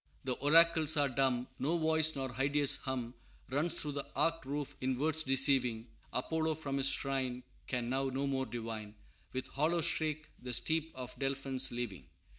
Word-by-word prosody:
"The 130 Hz, -, +1 dB
oracles 160 Hz, +2 st, +5 dB
are 145 Hz, -1 st, +3 dB
dumb; 130 Hz, -1 st, +1 dB
No 160 Hz, +5 st, +1 dB
voice 160 Hz, -1 st, +4 dB
nor 135 Hz, -2 st, -4 dB
hideous 140 Hz, +2 st, +2 dB
hum 125 Hz, -3 st, -4 dB, 0.4 s
Runs 155 Hz, +5 st, 0 dB
through 150 Hz, -3 st, -2 dB
the 140 Hz, -1 st, -4 dB
arched 165 Hz, -4 st, +1 dB
roof 145 Hz, 0 st, -3 dB
in 130 Hz, 0 st, 0 dB
words 155 Hz, +3 st, +2 dB
deceiving; 130 Hz, -4 st, +2 dB, 0.2 s
Apollo 160 Hz, +4 st, -1 dB
from 140 Hz, -3 st, -3 dB
his 135 Hz, 0 st, +4 dB
shrine 130 Hz, -2 st, -1 dB, 0.2 s
Can 125 Hz, -2 st, -1 dB
now 135 Hz, +2 st, 0 dB
no 135 Hz, +1 st, -1 dB
more 135 Hz, -1 st, -1 dB
divine, 110 Hz, -2 st, -6 dB, 0.4 s
With 130 Hz, 0 st, -3 dB
hollow 160 Hz, +4 st, 0 dB
shriek 155 Hz, -2 st, +1 dB
the 125 Hz, -1 st, -5 dB
steep 160 Hz, +5 st, +1 dB
of 125 Hz, -1 st, -6 dB
Delphns 135 Hz, -1 st, 0 dB
leaving." 110 Hz, -, -5 dB
135 Hz, 165 wpm, -33 LUFS, 125-155 Hz, 0.4 s, oracles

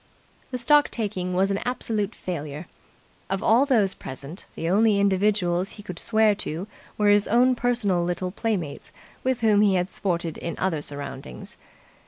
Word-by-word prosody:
The 255 Hz, -, -3 dB
stock 290 Hz, +4 st, +4 dB
taking 190 Hz, -5 st, -2 dB
was 195 Hz, +2 st, +2 dB
an 195 Hz, -, 0 dB
absolute 225 Hz, -4 st, -2 dB
failure. 155 Hz, -3 st, -5 dB, 0.6 s
Of 195 Hz, 0 st, -2 dB
all 245 Hz, +6 st, +4 dB
those 215 Hz, -8 st, +3 dB
present 140 Hz, +7 st, -8 dB
the 165 Hz, -, -3 dB
only 205 Hz, +3 st, +3 dB
individuals 195 Hz, -2 st, +1 dB
he 205 Hz, -, -11 dB
could 180 Hz, -4 st, -6 dB
swear 220 Hz, -1 st, +3 dB
to 165 Hz, +5 st, -2 dB, 0.3 s
were 210 Hz, -1 st, +3 dB
his 205 Hz, 0 st, +4 dB
own 250 Hz, +3 st, +4 dB
personal 235 Hz, -8 st, +1 dB
little 180 Hz, +1 st, -2 dB
playmates 195 Hz, -8 st, -3 dB, 0.3 s
with 255 Hz, -2 st, 0 dB
whom 215 Hz, -2 st, +4 dB
he 200 Hz, -2 st, +4 dB
had 180 Hz, +1 st, -1 dB
sported 170 Hz, -4 st, -2 dB
in 170 Hz, -, -4 dB
other 170 Hz, -5 st, -1 dB
surroundings. 140 Hz, -, -6 dB
195 Hz, 160 wpm, -25 LUFS, 175-220 Hz, 0.6 s, stock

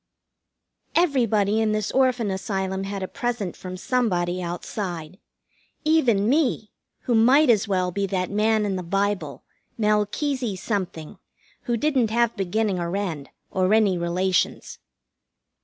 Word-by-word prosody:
Everybody 225 Hz, -, +2 dB
in 215 Hz, -1 st, +1 dB
this 215 Hz, -1 st, -1 dB
Orphan 255 Hz, -5 st, +2 dB
Asylum 190 Hz, 0 st, -2 dB
had 195 Hz, -1 st, -4 dB
a -, -, -3 dB
present 240 Hz, -8 st, -3 dB
from 185 Hz, 0 st, -7 dB
somebody 185 Hz, -6 st, 0 dB
outside. 175 Hz, 0 st, -5 dB, 0.7 s
Even 245 Hz, -11 st, +3 dB
me, 255 Hz, -5 st, +1 dB, 0.3 s
who 245 Hz, -, -1 dB
might 255 Hz, +5 st, +5 dB
as 215 Hz, -1 st, +2 dB
well 185 Hz, -2 st, 0 dB
be 200 Hz, +2 st, -1 dB
that 185 Hz, -1 st, -2 dB
man 215 Hz, +1 st, +2 dB
in 195 Hz, -2 st, -1 dB
the -, -, -3 dB
Bible, 195 Hz, +3 st, -2 dB, 0.3 s
Melchesey 215 Hz, +3 st, 0 dB
something, 185 Hz, -3 st, -4 dB, 0.5 s
who 240 Hz, -1 st, 0 dB
didn't 260 Hz, -4 st, +1 dB
have 235 Hz, +1 st, +1 dB
beginning 200 Hz, 0 st, -1 dB
or 170 Hz, +2 st, -2 dB
end, 165 Hz, -9 st, -4 dB, 0.2 s
or 185 Hz, 0 st, +1 dB
any 210 Hz, -4 st, +3 dB
relations. 175 Hz, +1 st, -1 dB
205 Hz, 130 wpm, -24 LUFS, 185-230 Hz, 0.7 s, might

